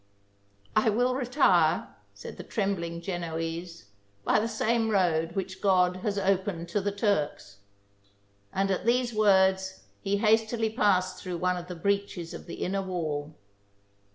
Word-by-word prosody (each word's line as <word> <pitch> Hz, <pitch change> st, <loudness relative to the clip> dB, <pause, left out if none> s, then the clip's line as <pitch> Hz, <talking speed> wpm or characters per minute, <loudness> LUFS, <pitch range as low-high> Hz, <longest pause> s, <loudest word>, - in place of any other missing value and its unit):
" -, -, -38 dB, 0.3 s
I 215 Hz, +1 st, +4 dB
will 245 Hz, +4 st, +2 dB
retire," 255 Hz, +2 st, +3 dB, 0.3 s
said -, -, -9 dB
the -, -, -7 dB
trembling 175 Hz, -6 st, -2 dB
Genoese, 165 Hz, -, -5 dB, 0.2 s
" 100 Hz, 0 st, -38 dB
by -, -, +4 dB
the 220 Hz, -, 0 dB
same 230 Hz, 0 st, 0 dB
road 170 Hz, -5 st, +1 dB
winch 190 Hz, 0 st, -4 dB
God 185 Hz, -2 st, +3 dB
has 200 Hz, +2 st, -2 dB
opened 190 Hz, -3 st, 0 dB
to 205 Hz, +3 st, 0 dB
the 205 Hz, +1 st, -1 dB
Turks 155 Hz, -, -1 dB, 0.5 s
"; 100 Hz, 0 st, -37 dB
and 195 Hz, +1 st, 0 dB
at 190 Hz, -, -2 dB
these 240 Hz, 0 st, +2 dB
words 190 Hz, -2 st, +3 dB, 0.2 s
he 200 Hz, 0 st, 0 dB
hastily 220 Hz, +1 st, +2 dB
passed 185 Hz, -5 st, +1 dB
through 180 Hz, -2 st, -4 dB
one 180 Hz, +1 st, +1 dB
of 175 Hz, 0 st, -6 dB
the 180 Hz, -, -6 dB
breaches 200 Hz, -1 st, -2 dB
of -, -, -9 dB
the -, -, -6 dB
inner 195 Hz, +2 st, -1 dB
wall. 155 Hz, -5 st, -3 dB
190 Hz, 155 wpm, -28 LUFS, 170-210 Hz, 0.5 s, I